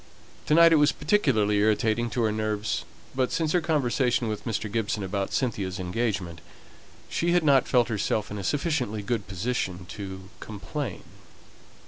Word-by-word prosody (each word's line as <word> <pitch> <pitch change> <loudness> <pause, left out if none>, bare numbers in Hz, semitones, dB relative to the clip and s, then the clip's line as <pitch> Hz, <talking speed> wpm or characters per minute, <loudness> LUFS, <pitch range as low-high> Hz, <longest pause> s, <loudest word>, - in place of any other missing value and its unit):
To 150 - +4
night 165 0 +7
it - - +6
was 150 0 +5
particularly 110 - +2
irritating 110 +2 +2
to 120 0 -1
her 110 - +2
nerves; 110 0 -2 0.3
but 130 -1 0
since 160 -2 0
her 180 - +2
conversation 130 -6 +1
with 105 -1 -5
Mr. 110 -1 -2
Gibson 105 -2 -1
about 95 +1 -2
Cynthia's 100 -7 -2
engagement, 90 -3 -2 0.7
she 170 +1 0
had 175 -2 +3
not 140 -4 +4
felt 120 -2 +3
herself 105 -1 -1
in 105 - -4
a - - -5
sufficiently 125 - -1
good 110 -1 -2
position 95 -2 -3
to 95 -2 -7
complain. 125 +7 -5
110 Hz, 155 wpm, -26 LUFS, 100-135 Hz, 0.7 s, night